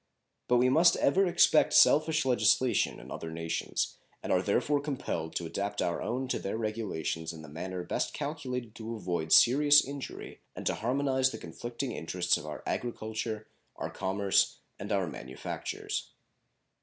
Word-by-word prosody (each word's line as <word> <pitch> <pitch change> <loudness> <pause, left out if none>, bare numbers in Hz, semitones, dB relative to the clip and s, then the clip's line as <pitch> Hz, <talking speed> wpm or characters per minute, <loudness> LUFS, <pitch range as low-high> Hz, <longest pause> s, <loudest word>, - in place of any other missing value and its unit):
But 125 - +4
we 125 +1 +4
must 160 +7 +5
ever 190 +7 +3
expect 170 -3 +4
selfish 155 0 +5
legislation 125 0 +2
in - - -12
other 80 - -5
nations, 80 0 -3 0.3
and - - 0
are - - +3
therefore 145 -1 +1
compelled 130 - -4
to 85 - -2
adapt 100 +5 -3
our 85 - -1
own 130 +2 -2
to - - -1
their 100 - -3
regulations 105 -7 -3
in 80 -1 -10
the - - -10
manner 90 +4 -5
best - - -2
calculated 130 -6 -4
to 115 +1 -5
avoid 85 -6 -3
serious 145 +4 +7
injury 140 0 -7
and - - -7
to - - +2
harmonize 130 +2 +1
the - - -6
conflicting 120 +9 -5
interests 90 -2 0
of 75 - -6
our 75 -4 -7
agriculture, 110 -2 -3 0.3
our - - -5
commerce, 95 +1 +1 0.2
and 100 +2 -6
our 100 -2 +1
manufactures. 65 -5 -5
110 Hz, 155 wpm, -30 LUFS, 90-135 Hz, 0.3 s, serious